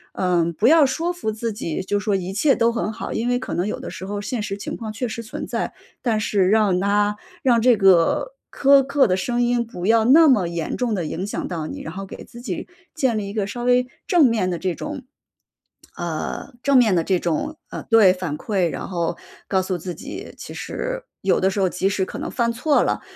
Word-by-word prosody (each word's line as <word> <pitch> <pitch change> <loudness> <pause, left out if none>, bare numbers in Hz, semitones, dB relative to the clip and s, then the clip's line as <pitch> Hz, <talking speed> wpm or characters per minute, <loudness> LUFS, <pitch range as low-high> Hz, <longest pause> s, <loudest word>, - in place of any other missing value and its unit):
嗯， 175 -2 +1
不 210 +8 +2
要 310 0 +7
说 330 +6 -1
服 350 -11 -3
自 220 +1 -3
己， 170 -4 -3
就 205 - 0
说 205 -1 0
一 185 +1 -5
切 275 +7 +3
都 230 0 +3
很 230 -2 -2
好， - - -6
因 235 +2 -1
为 245 0 +1
可 255 - -5
能 175 - 0
有 210 - -3
的 - - -7
时 185 - -7
候 205 +1 -4
现 215 +1 -3
实 200 -1 -4
情 - - -5
况 220 -2 -5
确 230 +3 -3
实 230 +1 -5
存 215 - -6
在。 - - -3 0.3
但 225 -4 +1
是 195 -3 +2
让 210 -4 +3
它， 205 +1 +2 0.3
让 235 -3 +4
这 250 0 +5
个 195 - +4 0.2
苛 275 0 +5
刻 280 0 +3
的 185 - +1
声 240 +6 -1
音 240 0 +1
不 180 -5 -7
要 225 0 +4
那 310 +7 +7
么 205 -10 +3
严 170 -2 -3
重 245 -3 0
的 185 - -1
影 170 +4 -3
响 - - -3
到 160 -3 -4
你。 - - -7
然 160 - -6
后 195 +1 -6
给 - - -10
自 235 - -13
己 245 - -5 0.3
建 260 -8 +1
立 205 -2 -3
一 200 - -7
个 210 -3 -1
稍 240 +4 -5
微 250 0 +3 0.2
正 345 -6 +5
面 220 -7 +2
的 175 - -2
这 185 -2 -1
种 300 -3 -6 0.9
呃， 170 - -4
正 280 -1 +4
面 220 -7 +5
的 165 - +2
这 185 0 +1
种， 175 - -2
呃 - - -6
对， 220 -5 +6
反 175 -5 -4
馈， 190 -6 0
然 - - -5
后 170 -2 -2 0.3
告 190 -1 +2
诉 185 -1 -2
自 175 +1 -6
己， - - -8
其 - - -9
实 - - -4 0.2
有 190 - +2
的 190 - +3
时 195 - -3
候 190 - +3
即 190 +2 0
使 195 -1 0
可 - - -8
能 - - -4
犯 235 -2 +1
错 285 +5 +2
了， - - -1
210 Hz, 255 characters per minute, -22 LUFS, 185-245 Hz, 0.9 s, 要